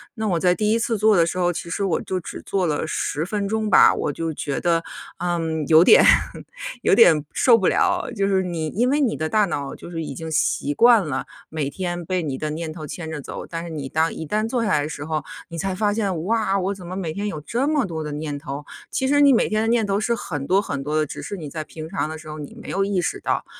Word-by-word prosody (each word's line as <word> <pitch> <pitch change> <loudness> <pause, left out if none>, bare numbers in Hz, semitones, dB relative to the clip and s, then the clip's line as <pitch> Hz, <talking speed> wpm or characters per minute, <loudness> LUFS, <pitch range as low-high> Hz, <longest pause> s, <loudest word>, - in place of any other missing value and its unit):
那 220 -2 -2
我 175 -4 +1
在 180 +1 +3
第 210 +1 +1
1 230 - +2
次 230 -1 0
做 215 +1 +4
的 170 - +5
时 180 - -3
候， 175 -1 +2
其 170 - -6
实 200 +4 -2
我 180 -4 0
就 185 - -3
只 170 - -8
做 190 -2 -1
了 150 -3 -1
10 155 - -2
分 200 +2 -2
钟 220 0 -1
吧， - - +7
我 145 - -1
就 165 +2 -3
觉 140 -1 -3
得， 165 -1 +1 0.4
嗯， 165 -3 -1
有 160 +1 +7
点 - - +7 0.8
有 - - +4
点 160 -10 +6
受 245 - +5
不 195 -5 +2
了， - - +2
就 200 -2 +1
是 190 -1 +2
你 170 -3 -3
因 240 +10 +1
为 290 +2 +2
你 255 -6 +1
的 155 0 -2
大 210 +2 +3
脑 145 -6 -4
就 - - -11
是 165 -1 -3
已 145 - -6
经 160 +2 -6
习 145 -1 +1
惯 230 -4 +5
了， 135 -3 -2 0.2
每 155 -3 -2
天 175 +2 -4
被 180 0 -1
你 140 -3 -3
的 155 - -2
念 160 0 -4
头 155 -3 -8
牵 160 0 -6
着 150 -2 -5
走， - - -7
但 165 0 -5
是 170 - -7
你 150 -4 -5
当 160 +3 +1
一 160 - -6
旦 215 +7 0
坐 240 -2 0
下 - - 0
来 150 - +3
的 145 - -3
时 145 -2 -6
候， 155 -2 -2 0.3
你 165 - -7
才 190 0 -2
发 205 +1 +1
现： 195 -7 -1
“哇， 215 -2 +1
我 190 +2 -1
怎 180 -3 -10
么 185 - -5
每 170 -5 -3
天 205 +4 -3
有 160 -7 -4
这 240 - -1
么 295 -5 +2
多 160 -3 -4
的 150 - -5
念 150 -1 -4
头？” 140 +1 -6 0.2
其 265 - -1
实 290 +1 +4
你 280 - +7
每 245 - +3
天 215 0 0
的 225 - 0
念 230 -2 +2
头 200 0 0
是 235 +2 0
很 145 -10 -5
多 190 +2 +4
很 140 -9 -3
多 150 +2 -1
的， 155 - +2
只 - - -7
是 200 - -5
你 155 -4 -7
在 155 +1 -5
平 155 +1 -9
常 180 -4 -2
的 160 - -6
时 155 0 -13
候 155 0 -7
你 145 - -8
没 - - -10
有 195 +1 0
意 195 -2 0
识 175 - -2
到， - - -1
175 Hz, 290 characters per minute, -22 LUFS, 155-205 Hz, 0.8 s, 吧